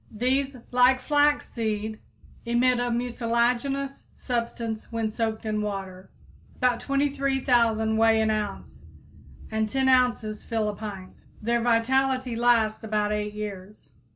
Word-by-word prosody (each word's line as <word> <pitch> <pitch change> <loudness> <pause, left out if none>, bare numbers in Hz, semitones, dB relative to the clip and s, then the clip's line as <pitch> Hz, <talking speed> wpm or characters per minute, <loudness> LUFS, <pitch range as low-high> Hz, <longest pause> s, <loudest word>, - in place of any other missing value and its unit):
These, 260 +4 0
like 250 +1 +5
flaxseed, 230 -7 0 0.4
emit 240 +1 +2
a 245 0 0
mucilaginous 245 +3 -1
substance 230 -3 -4
when 225 -2 -1
soaked 220 0 -2
in 215 -1 -1
water. 190 -2 -5 0.5
About 250 -2 +1
23,000 265 -6 +1
weigh 225 0 +4
an 220 0 +2
ounce, 210 -2 -4 0.7
and 220 0 0
10 265 +3 +1
ounces 245 -5 +2
fill 220 -2 -1
a 205 - -4
pint. 195 -3 -9
Their 235 +2 0
vitality 255 +2 +1
lasts 225 -2 +2
about 210 -1 0
eight 210 0 -2
years. 205 -5 -8
230 Hz, 120 wpm, -26 LUFS, 215-255 Hz, 0.7 s, like